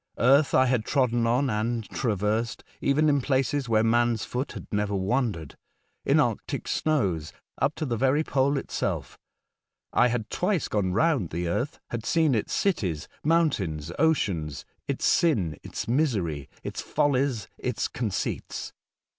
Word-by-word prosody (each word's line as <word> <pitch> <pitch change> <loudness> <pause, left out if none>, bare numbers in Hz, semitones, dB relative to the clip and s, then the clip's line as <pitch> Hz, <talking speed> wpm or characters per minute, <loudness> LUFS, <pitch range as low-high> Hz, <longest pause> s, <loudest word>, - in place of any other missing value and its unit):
Eartb 135 +4 +4
I 130 - +6
bad 125 -4 +1
trodden 120 -3 +1
on 125 +4 +2
and 115 0 -1
traversed, 110 0 -1 0.2
even 150 +3 +3
in 145 -2 +3
places 135 0 0
wbere 110 -1 +3
man's 120 -1 +2
foot 130 +3 -2
bad - - -7
never 105 -1 0
wandered, 100 - -1 0.5
in - - +4
Arctic - - -1
snows, 100 - 0 0.3
up 140 +2 +1
to 155 - -3
tbe 120 -5 -2
very 135 +4 +3
Pole 140 -1 +1
itself. - - -3 0.7
I 120 - +5
bad 120 -2 -2
twice 180 -2 0
gone 100 -3 0
round 135 - +2
your 85 +9 0
eartb, 155 - -25
bad 115 -2 -3
seen 160 -4 +3
its 110 - -1
cities, 95 - 0 0.2
mountains, 100 - +1
oceans, 95 - +1 0.2
its - - -1
sin, 95 - +2
its - - -6
misery, 105 - 0
its - - -4
follies, 135 -6 0
its 125 -1 -1
conceits. 110 -6 -3
120 Hz, 145 wpm, -26 LUFS, 105-140 Hz, 0.7 s, I